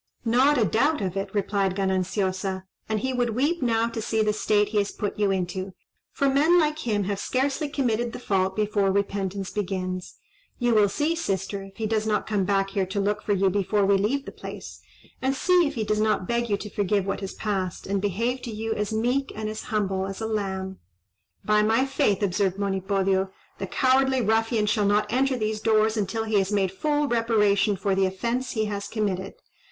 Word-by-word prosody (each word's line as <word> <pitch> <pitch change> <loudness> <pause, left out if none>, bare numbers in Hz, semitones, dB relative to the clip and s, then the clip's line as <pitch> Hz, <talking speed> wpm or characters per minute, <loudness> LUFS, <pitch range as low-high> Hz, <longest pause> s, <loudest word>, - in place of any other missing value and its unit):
"Not 260 +6 +4
a 225 - +3
doubt 280 - +2
of 185 -2 -2
it," 195 0 -2
replied 195 -2 0
Gananciosa; 190 0 -1 0.3
"and 215 -1 0
he 260 +2 -1
would 240 -3 0
weep 295 +7 +1
now 230 -2 +2
to 230 -1 -4
see 220 0 0
the 210 0 +1
state 210 -1 +2
he 210 -1 +1
has 200 - -1
put 205 0 -4
you 205 -1 +3
into: 185 0 -2 0.4
for 280 - 0
men 295 +6 +4
like 305 -1 +1
him 205 -2 +1
have 200 +1 -2
scarcely 275 +5 -1
committed 240 -5 0
the - - -6
fault 190 -5 0
before 205 -2 +1
repentance 195 -1 -2
begins. 185 -3 -3 0.4
You 245 -1 +2
will 210 -2 +5
see, 300 +10 0
sister, 195 - -2
if 195 0 -12
he 220 - -2
does 215 0 0
not 215 - +1
come 200 -3 0 0.2
here 195 -1 -1
to 195 +2 -2
look 205 +1 0
for 205 - 0
you 195 -1 +2
before 200 +1 +1
we 200 0 +4
leave 240 +9 0
the - - -7
place; - - -9 0.4
and 265 +1 +1
see 355 +2 +3
if 285 - -5
he 225 - -1
does 215 0 0
not 215 -4 +1
beg 235 0 0
you 205 - +2
to 210 - -7
forgive 200 -1 0
what 195 - -2
has 195 -1 -6
passed, 190 -4 -3
and 195 0 -1
behave 230 +6 -1
to 235 - -6
you 220 +1 -2
as 210 0 -2
meek 245 +5 0
and 215 0 -3
as 215 - -6
humble 195 -3 -1
as 195 0 -6
a 220 - -3
lamb." 190 -3 -3 0.7
"By 210 0 +4
my 225 +5 +3
faith," 210 -7 +1
observed 195 0 +1
Monipodio, 195 -1 0 0.3
"the 195 - -3
cowardly 265 +2 +2
ruffian 225 0 +2
shall 210 -1 +2
not 210 +2 +1
enter 265 +1 +2
these 215 -1 -1
doors 220 0 +3
until 215 +1 -1
he 220 -2 +2
has 195 +1 -1
made 195 -3 +1
full 295 +8 0
reparation 210 -4 +2
for 195 +1 -1
the 190 0 +2
offence 235 +7 -2
he 220 -3 0
has 200 -1 -4
committed. 200 -3 -2
210 Hz, 205 wpm, -25 LUFS, 195-230 Hz, 0.7 s, will